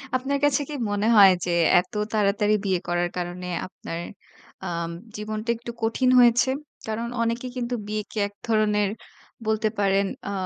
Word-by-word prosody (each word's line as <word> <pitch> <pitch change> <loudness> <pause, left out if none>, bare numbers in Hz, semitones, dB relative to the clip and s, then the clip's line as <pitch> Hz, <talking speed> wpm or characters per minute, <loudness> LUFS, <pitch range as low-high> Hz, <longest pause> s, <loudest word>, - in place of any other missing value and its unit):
আপনার 275 +2 0
কাছে 290 -1 +3
কি - - -5 0.2
মনে 205 +2 0
হয় 195 -2 +9
যে 175 - -1 0.3
এত 180 +3 -6 0.2
তাড়াতাড়ি 210 0 +2
বিয়ে 185 -2 +1
করার 175 0 0
কারণে 180 +1 -4 0.2
আপনার 165 -2 -7 0.6
আ - - -4 0.5
জীবনটা 215 +2 -5
একটু 235 0 -7
কঠিন 250 +3 +2
হয়েছে। 245 +2 +5 0.4
কারণ 225 +2 -2
অনেকেই 235 +2 -1
কিন্তু 245 0 -2
বিয়েকে 215 +1 -5
এক 205 - -16
ধরনের 210 -2 +2 0.6
বলতে 220 0 +1
পারেন 195 0 +3 0.2
আ - - -3
215 Hz, 150 wpm, -25 LUFS, 195-235 Hz, 0.6 s, হয়